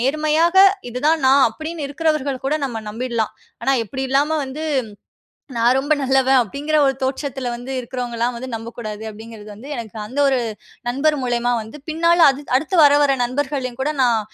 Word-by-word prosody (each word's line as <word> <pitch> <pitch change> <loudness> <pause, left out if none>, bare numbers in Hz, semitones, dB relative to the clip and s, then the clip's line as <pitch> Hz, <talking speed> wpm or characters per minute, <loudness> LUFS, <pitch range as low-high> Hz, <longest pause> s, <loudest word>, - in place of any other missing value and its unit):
நேர்மையாக 310 +6 +1 0.3
இதுதான் 300 +7 +1
நான். 270 +1 +6
அப்படின்னு 315 +6 -6
இருக்கிறவர்கள் 290 -3 -1
கூட 275 +3 +1
நம்ம 235 -5 -4
நம்பிடலாம். 230 -1 -2 0.3
ஆனா 270 - +2
இப்படி 265 +5 -5
இல்லாம 285 +4 +2
வந்து, 275 +4 -7 0.9
"நான் 235 +2 +3
ரொம்ப 290 +3 +2
நல்லவன்" 265 0 +3
அப்படிங்கிற 290 +8 -2
ஒரு 270 - +2
தோற்றத்தில 265 -2 -3
வந்து 245 +3 -7
இருக்கிறவங்கலாம் 240 -1 -3
வந்து 260 +2 -7
நம்பக்கூடாது, 225 -2 -7
அப்படிங்கிறது 215 0 -11
வந்து 260 +7 -11
எனக்கு 225 -2 -7
அந்த 260 +7 -3
ஒரு 265 -2 +2 0.5
நண்பர் 295 +4 +1
மூலியமா 245 0 0
வந்து, 220 +7 -11
பின் 320 +2 -6
நாள்ல 340 -2 +6
அ - - -2 0.2
அடுத்து 330 +5 -2
வர, 285 - +7
வர 275 -1 +2
நண்பர்களையும் 265 -1 -3
கூட, 300 +3 0
நான் 235 -3 +2
265 Hz, 165 wpm, -20 LUFS, 240-290 Hz, 0.9 s, வர